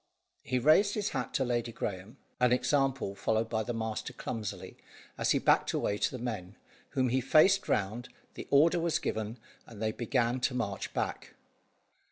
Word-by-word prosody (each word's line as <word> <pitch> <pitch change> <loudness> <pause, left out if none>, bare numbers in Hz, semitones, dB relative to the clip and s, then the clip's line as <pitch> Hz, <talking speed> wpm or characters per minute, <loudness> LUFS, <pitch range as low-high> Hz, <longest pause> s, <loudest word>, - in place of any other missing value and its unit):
He 130 - -1
raised 155 - +4
his 210 -1 -1
hat - - -3
to 130 - +2
Lady 120 -1 -1
Graeme, 100 +3 -5 0.2
an 125 -1 +4
example 135 -4 +1
followed 110 +3 0
by 110 -1 0
the 110 - -3
master 110 +2 -4
clumsily, 110 -4 -5 0.4
as - - -1
he - - +4
backed - - +3
away 105 0 -1
to - - +2
the 130 - -6
men, 100 -6 -5 0.4
whom 130 -1 +3
he 130 +2 +1
faced 155 +10 +4
round, 110 +5 -1 0.2
the - - -8
order 165 +5 +5
was 165 -1 +1
given, 110 +2 -3 0.3
and 110 - -12
they 110 0 0
began 120 +1 0
to 125 0 0
march 100 -6 -3
back. - - -3
120 Hz, 175 wpm, -30 LUFS, 110-135 Hz, 0.4 s, order